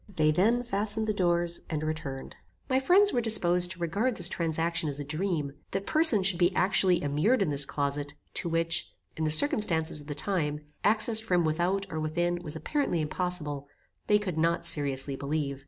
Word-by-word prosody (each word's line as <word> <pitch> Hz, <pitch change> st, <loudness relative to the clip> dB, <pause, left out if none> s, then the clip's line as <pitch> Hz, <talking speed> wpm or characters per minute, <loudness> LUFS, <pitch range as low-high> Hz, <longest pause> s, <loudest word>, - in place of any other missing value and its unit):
They 155 Hz, -2 st, +2 dB
then 225 Hz, +9 st, +1 dB
fastened 220 Hz, -1 st, -2 dB
the 215 Hz, -, -1 dB
doors, 175 Hz, -3 st, -1 dB
and 155 Hz, -2 st, -4 dB
returned. 155 Hz, -4 st, -6 dB, 0.3 s
My 260 Hz, 0 st, +1 dB
friends 385 Hz, +9 st, +3 dB
were 240 Hz, -, 0 dB
disposed 180 Hz, -6 st, +5 dB
to 185 Hz, 0 st, -7 dB
regard 205 Hz, +9 st, -2 dB
this 175 Hz, -1 st, +2 dB
transaction 165 Hz, -1 st, -2 dB
as 140 Hz, 0 st, -4 dB
a -, -, -4 dB
dream. 155 Hz, -1 st, -3 dB, 0.2 s
That 195 Hz, 0 st, -3 dB
persons 280 Hz, -, +5 dB
should 185 Hz, -3 st, +2 dB
be 175 Hz, +1 st, +1 dB
actually 185 Hz, -2 st, +3 dB
immured 160 Hz, -, +1 dB
in 165 Hz, -, -2 dB
this 140 Hz, -1 st, +1 dB
closet, 145 Hz, 0 st, -3 dB, 0.2 s
to 170 Hz, -, -1 dB
which, 165 Hz, 0 st, -1 dB, 0.2 s
in 160 Hz, -, -3 dB
the -, -, 0 dB
circumstances 160 Hz, -, +2 dB
of 145 Hz, -, -15 dB
the 145 Hz, -, -5 dB
time, 150 Hz, -4 st, -3 dB, 0.2 s
access 220 Hz, +1 st, +4 dB
from 180 Hz, -6 st, 0 dB
without 175 Hz, +5 st, -1 dB
or 160 Hz, -, -4 dB
within 175 Hz, +3 st, -2 dB
was 155 Hz, -2 st, -4 dB
apparently 275 Hz, -, -2 dB
impossible, 150 Hz, -3 st, -3 dB, 0.4 s
they 210 Hz, -, +4 dB
could 185 Hz, -6 st, -5 dB
not 170 Hz, +1 st, 0 dB
seriously 140 Hz, -4 st, +2 dB
believe. 140 Hz, 0 st, -4 dB
170 Hz, 185 wpm, -27 LUFS, 155-200 Hz, 0.4 s, disposed